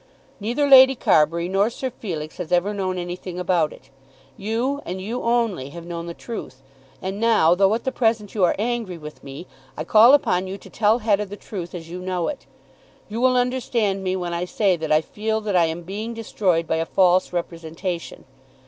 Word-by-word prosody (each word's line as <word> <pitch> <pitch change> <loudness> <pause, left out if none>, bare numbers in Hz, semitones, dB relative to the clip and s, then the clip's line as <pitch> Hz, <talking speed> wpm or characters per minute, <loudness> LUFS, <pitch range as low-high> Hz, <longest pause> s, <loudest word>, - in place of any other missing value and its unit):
Neither 240 +8 0
Lady 265 -1 +8
Carbury 170 -4 +2
nor 195 +3 +2
Sir 255 +2 -5
Felix 165 -10 -6
has 180 -3 -6
ever 180 +4 +2
known 190 -2 -2
anything 175 0 -6
about 175 -4 +1
it. 135 - -16 0.4
You, 235 +7 -2
and 185 +2 -5
you 225 +6 -4
only, 230 - 0
have 170 +3 -10
known 170 0 -6
the 170 - -6
truth. 135 - -8 0.4
And 190 +2 -4
now, 220 -8 +4
though 195 +2 +3
at 230 - -4
the 260 - -1
present 225 -5 0
you 205 - 0
are 180 - +3
angry 225 -4 -2
with 150 -1 -11
me, 140 +5 -9 0.3
I - - -3
call 225 - +7
upon 200 -10 0
you 190 +1 -5
to - - -15
tell 215 +1 +3
Hetta 210 -3 +1
the 205 +2 -8
truth 180 -5 -7
as 165 -2 -8
you 180 - -5
know 180 -2 -2
it. 285 - -7 0.6
You 225 +3 -4
will 255 0 +4
understand 240 -6 0
me 185 0 -1
when 175 -2 -3
I 170 +1 -2
say 190 0 +1
that 160 -2 -4
I 155 0 +5
feel 220 +5 -2
that 210 -2 -2
I 175 -2 +5
am 165 +2 -4
being 215 +6 -5
destroyed 190 -7 0
by 160 - -1
a 165 - -1
false 185 -1 +3
representation. 170 0 -5
190 Hz, 200 wpm, -22 LUFS, 170-225 Hz, 0.6 s, Lady